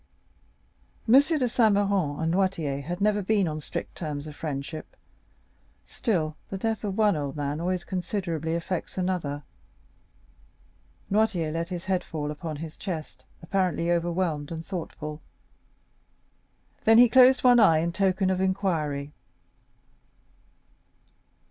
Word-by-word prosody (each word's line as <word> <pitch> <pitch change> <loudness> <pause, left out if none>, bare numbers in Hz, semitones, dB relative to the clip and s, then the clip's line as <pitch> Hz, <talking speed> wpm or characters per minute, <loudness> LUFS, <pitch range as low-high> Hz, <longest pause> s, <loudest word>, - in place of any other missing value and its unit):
M. 225 - +4
de 270 - +10 0.3
Saint 225 -3 +3
Méran 195 -8 +1
and 160 +1 0
Noirtier 170 -7 0
had 175 +6 -5
never 210 0 +2
been 200 -1 +2
on 155 -1 -4
strict - - -5
terms 150 -3 -5
of 150 -1 -9
friendship; 150 +1 -6 0.9
still, 160 - -1
the 195 - -4
death 220 +2 -2
of 200 -2 -3
one 210 -4 +4
old 145 -2 -3
man 145 +1 -3
always 180 0 -1
considerably 175 -4 -2
affects 170 +2 -4
another. 175 -6 -2 1.7
Noirtier 200 -7 +1
let 165 +1 -2
his 175 -2 -5
head 185 -1 0
fall 150 -2 -4
upon 155 +1 -5
his 155 +1 -8
chest, 165 -6 -6 0.2
apparently 175 -2 0
overwhelmed 170 -3 -1
and 165 0 -5
thoughtful; 155 -4 -6 1.6
then 225 0 +6
he 245 +1 +9
closed 260 +2 +6
one 245 -1 +7
eye, 165 -8 +6
in 170 +2 0
token 190 0 +1
of 185 0 0
inquiry. 160 -7 -1
175 Hz, 130 wpm, -26 LUFS, 155-195 Hz, 1.7 s, de